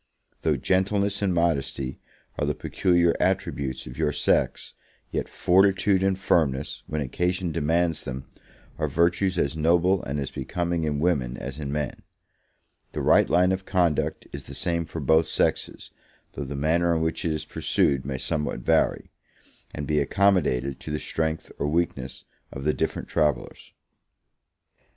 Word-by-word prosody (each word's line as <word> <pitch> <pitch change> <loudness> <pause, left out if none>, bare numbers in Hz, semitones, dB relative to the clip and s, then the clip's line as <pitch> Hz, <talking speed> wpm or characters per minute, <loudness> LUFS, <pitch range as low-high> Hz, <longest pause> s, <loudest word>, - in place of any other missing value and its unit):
Though - - +1
gentleness 100 +2 +1
and 100 -2 +2
modesty 70 -6 -1 0.4
are - - 0
the - - 0
peculiar 85 -2 +2
attributes 70 -8 -1
of - - -9
your 75 - +2
sex, 75 - 0 0.4
yet - - -2
fortitude 95 +1 +3
and 95 -1 +2
firmness, 75 -7 0
when 75 0 -2
occasion 90 +6 -1
demands 80 +1 +1
them, 65 +1 -6 0.5
are 75 - +1
virtues 85 +5 +1
as 70 -2 0
noble 85 +4 +3
and 70 +2 -3
as 70 - -4
becoming 85 +4 -2
in 75 -2 -1
women 70 -7 0
as 70 +3 -6
in 70 -2 -4
men: 75 -2 -3 0.9
the - - -3
right - - +5
line 90 +1 +4
of 95 0 -2
conduct 85 -5 +1
is - - -7
the - - -9
same 85 -1 -1
for - - -6
both 80 +1 +3
sexes, - - -1 0.4
though 70 - -5
the 70 - -5
manner 85 +4 +2
in 80 - 0
which 80 0 -1
it 85 - 0
is 75 - -3
pursued 70 -2 +1
may 65 -1 -3
somewhat 75 -3 -2
vary, - - +1 0.6
and 75 - -5
be 75 +1 +1
accommodated 70 -6 +2
to - - -8
the 75 - -1
strength 80 +1 -2
or 70 - 0
weakness 75 -5 -2 0.3
of 65 - -7
the 75 +1 +2
different - - -2
travellers. 75 -5 -1
80 Hz, 155 wpm, -25 LUFS, 70-90 Hz, 0.9 s, right